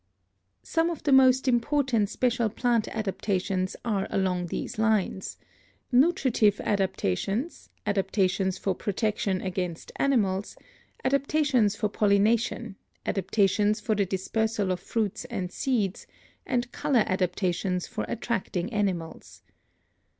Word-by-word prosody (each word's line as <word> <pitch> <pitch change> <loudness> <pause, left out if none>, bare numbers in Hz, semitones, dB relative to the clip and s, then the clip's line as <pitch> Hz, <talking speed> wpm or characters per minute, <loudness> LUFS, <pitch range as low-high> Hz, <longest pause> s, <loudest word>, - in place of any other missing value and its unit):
Some 330 +1 +1
of 335 - -5
the 290 - +1
most 260 0 +5
important 245 -3 +2
special 235 -1 +1
plant 235 0 +1
adaptations 195 -3 -2
are 205 -4 0
along 180 -2 0
these 215 - -5
lines: 215 -4 0 0.5
nutritive 255 - +3
adaptations, 195 - -1 0.2
adaptations 195 -2 +1
for 195 - -1
protection 205 -1 -1
against 180 -3 -4
animals, 205 -8 +1 0.5
adaptations 275 -5 +2
for 210 -1 0
pollination, 210 +2 +1 0.3
adaptations 205 +2 +1
for 215 +1 0
the 200 -2 +1
dispersal 205 +1 -1
of 180 - -1
fruits 215 +3 -2
and 195 -8 -4
seeds, 215 -7 -1 0.4
and 240 -1 -1
color 275 -7 +2
adaptations 180 0 -1
for - - -4
attracting 215 -3 -2
animals. 165 - -3
210 Hz, 105 wpm, -27 LUFS, 190-240 Hz, 0.5 s, most